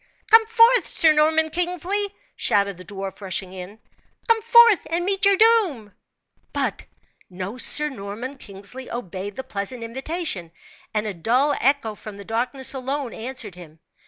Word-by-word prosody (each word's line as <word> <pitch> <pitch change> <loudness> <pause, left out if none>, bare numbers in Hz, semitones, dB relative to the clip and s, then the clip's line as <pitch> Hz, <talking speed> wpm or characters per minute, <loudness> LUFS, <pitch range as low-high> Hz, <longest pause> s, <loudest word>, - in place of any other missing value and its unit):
"Come 445 0 +7
forth, 465 +2 +4
Sir 320 -3 +4
Norman 315 +1 +2
Kingsley!" 360 +4 +1 0.3
shouted 200 -2 0
the - - -10
dwarf, 195 0 -8
rushing 190 -1 -4
in. 190 +3 -9 0.5
"Come 455 -1 +3
forth 470 -2 +5
and 340 +2 -1
meet 395 +1 +1
your 395 -1 +5
doom!" 370 - +2 0.6
But - - -2 0.4
no 190 +6 -7
Sir 300 +3 +5
Norman 245 +2 -7
Kingsley 205 +6 -10
obeyed 195 -3 -6
the 265 - -6
pleasant 210 +4 -6
invitation, 265 - -4 0.4
and 210 0 -1
a 210 - -3
dull 250 - +1
echo 270 -4 +1
from 210 -1 -11
the 200 - -11
darkness 250 +4 -2
alone 270 0 -4
answered 235 -3 -7
him. 165 -3 -14
255 Hz, 150 wpm, -22 LUFS, 200-335 Hz, 0.6 s, Come